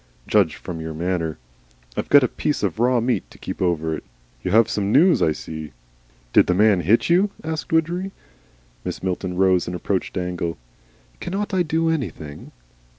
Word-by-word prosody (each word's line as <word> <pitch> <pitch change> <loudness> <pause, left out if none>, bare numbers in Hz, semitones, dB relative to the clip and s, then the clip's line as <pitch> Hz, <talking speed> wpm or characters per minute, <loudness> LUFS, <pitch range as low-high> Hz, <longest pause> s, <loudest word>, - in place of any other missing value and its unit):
Judged - - +3
from 85 -2 -7
your 80 -1 -5
manner. 85 -1 -2 0.6
I've - - -3
got 145 -1 +7
a - - +3
piece 150 +2 -2
of 100 -1 -1
raw 125 +1 +3
meat 120 +2 -1
to - - -16
keep - - -6
over 80 -3 0
it. - - -8 0.4
You - - -1
have 115 +1 +5
some 100 -1 -1
news, 170 - +5
I 80 - +4
see?" 80 0 -7 0.6
"Did - - +6
the 90 - +2
man 105 -1 +4
hit 105 +8 +3
you?" 185 +4 +4
asked 160 0 -4
Widgery. 170 +4 +1 0.7
Mrs. - - -5
Milton 90 -1 -2
rose 95 -2 +3
and 90 - -3
approached 95 +2 -2
Dangle. 90 -3 -2 0.6
"Cannot 200 +2 -3
I 185 - +3
do 165 0 +1
anything?" 95 - -5
100 Hz, 175 wpm, -22 LUFS, -, 0.7 s, got